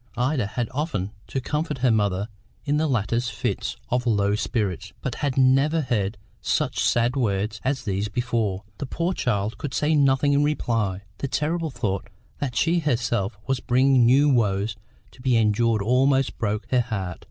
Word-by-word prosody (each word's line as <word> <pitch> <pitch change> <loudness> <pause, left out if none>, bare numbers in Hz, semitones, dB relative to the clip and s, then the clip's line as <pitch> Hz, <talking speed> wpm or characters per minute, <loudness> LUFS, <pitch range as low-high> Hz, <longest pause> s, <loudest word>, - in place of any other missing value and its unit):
Ida 125 -2 +1
had 120 +2 -2
often 130 - -2 0.2
to 135 - -2
comfort 150 +3 -2
her 125 - +5
mother 100 -2 +1 0.4
in 145 0 +1
the 155 +1 +1
latter's 120 -1 0
fits 105 - -3
of 125 0 0
low 100 -3 +2
spirits, 105 -3 -2
but 125 - -3
had 140 -3 -1
never 135 +5 +4
heard 105 -6 -1 0.2
such - - 0
sad 120 +2 +2
words 110 -3 -1
as 135 0 -1
these 100 -1 -1
before. 110 -4 -1 0.2
The 140 - -4
poor 170 +6 -1
child 110 - -1
could 135 -4 -4
say 150 +5 +2
nothing 140 -1 +3
in 140 +1 +3
reply; 115 -10 0 0.2
the 140 - -2
terrible 160 +4 -1
thought 100 -7 -3 0.3
that 135 -5 -3
she 170 +7 +2
herself 120 - -1
was 135 -1 0
bringing 130 +1 +3
new 140 +4 +5
woes 105 -5 +1 0.4
to 130 - -17
be 125 -2 +2
endured 110 0 +2
almost 135 +4 +2
broke 105 0 -1
her 125 -1 +4
heart. 100 -7 -4
120 Hz, 170 wpm, -24 LUFS, 105-135 Hz, 0.4 s, her